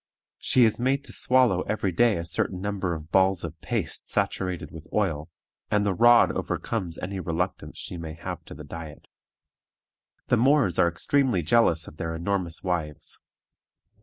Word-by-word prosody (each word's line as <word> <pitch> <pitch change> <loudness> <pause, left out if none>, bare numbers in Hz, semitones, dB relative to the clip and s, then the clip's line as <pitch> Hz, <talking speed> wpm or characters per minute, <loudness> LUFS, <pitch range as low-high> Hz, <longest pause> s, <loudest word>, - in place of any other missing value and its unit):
She 125 -2 +4
is 110 0 +1
made 135 +2 +1
to - - -10
swallow 125 -8 +3
every 105 -3 0
day 115 +4 +3
a 85 - -4
certain 90 +2 -1
number 95 -3 -2
of 80 +1 -10
balls 95 -1 +3
of 80 -1 -7
paste - - -3
saturated 90 -2 -2
with 80 -1 -11
oil, 85 -7 -1 0.4
and 105 -1 +2
the 100 - +1
rod 120 +4 +6
overcomes 95 -8 -3
any 95 +1 -4
reluctance 90 +1 -3
she 90 - -6
may 80 -2 -6
have - - -6
to - - -10
the 75 - -9
diet. 80 0 -9 1.2
The 125 - +4
Moors 130 - +3
are - - +5
extremely 120 +2 +1
jealous 85 -4 +3
of 75 - -12
their 80 +1 -3
enormous 85 -1 -2
wives. 80 -5 -3
90 Hz, 165 wpm, -26 LUFS, 85-110 Hz, 1.2 s, rod